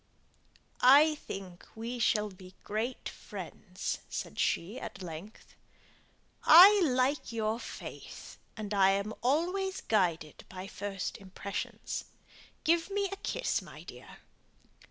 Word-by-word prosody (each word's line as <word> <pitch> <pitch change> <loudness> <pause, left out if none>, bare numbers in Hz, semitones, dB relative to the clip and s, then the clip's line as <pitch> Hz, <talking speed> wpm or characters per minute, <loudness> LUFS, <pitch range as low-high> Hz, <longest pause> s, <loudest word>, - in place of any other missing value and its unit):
"I 290 +5 +7
think 195 -10 -8
we 235 +2 -5
shall 210 -2 +2
be 185 0 -14
great 220 +5 -3
friends," - - -6
said - - -5
she, 195 +9 0
at 195 - -8
length. 175 +5 -9 0.9
"I 385 +5 +9
like 260 -1 +1
your 220 0 -1
face, - - -9 0.2
and 210 -1 -4
I 195 -1 +5
am 200 +2 0
always 360 - 0
guided 170 -8 0
by 185 0 -7
first 195 -1 -5
impressions. 195 +1 -5 0.6
Give 335 +2 +2
me 400 0 0
a - - -3
kiss, - - -1
my - - -12
dear." - - -12
220 Hz, 115 wpm, -31 LUFS, 195-300 Hz, 0.9 s, I